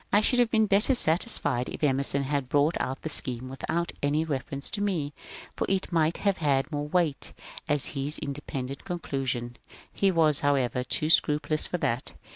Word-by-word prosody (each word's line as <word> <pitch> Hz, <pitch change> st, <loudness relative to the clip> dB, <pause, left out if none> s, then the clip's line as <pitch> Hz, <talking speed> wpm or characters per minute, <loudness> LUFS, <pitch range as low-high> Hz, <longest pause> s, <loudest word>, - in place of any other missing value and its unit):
I 205 Hz, -, +5 dB
should 245 Hz, +4 st, +3 dB
have 240 Hz, -2 st, +4 dB
been 220 Hz, -1 st, +3 dB
better 210 Hz, +6 st, +4 dB
satisfied 160 Hz, -, +1 dB
if -, -, -7 dB
Emerson 140 Hz, 0 st, +1 dB
had 140 Hz, -2 st, -2 dB
brought 145 Hz, +4 st, +2 dB
out 135 Hz, +1 st, -3 dB
the -, -, -3 dB
scheme 130 Hz, -3 st, 0 dB
without 170 Hz, +6 st, -2 dB
any 150 Hz, +3 st, +1 dB
reference 140 Hz, -1 st, -4 dB
to 205 Hz, -, -2 dB
me, 165 Hz, -8 st, -1 dB, 0.4 s
for -, -, -2 dB
it 190 Hz, 0 st, -1 dB
might 165 Hz, -1 st, +2 dB
have 200 Hz, -2 st, +1 dB
had 140 Hz, -1 st, +1 dB
more 145 Hz, -1 st, -3 dB
weight 165 Hz, -3 st, -1 dB, 0.4 s
as 145 Hz, -2 st, +2 dB
his 140 Hz, +1 st, -2 dB
independent 140 Hz, -1 st, -5 dB
conclusion. 130 Hz, -8 st, -3 dB, 0.4 s
He 195 Hz, -, +2 dB
was, 160 Hz, -5 st, +3 dB
however, 130 Hz, -3 st, +1 dB
too 155 Hz, +4 st, +1 dB
scrupulous 150 Hz, -1 st, +2 dB
for 180 Hz, -, -2 dB
that. 120 Hz, -6 st, -2 dB
150 Hz, 175 wpm, -27 LUFS, 135-170 Hz, 0.4 s, I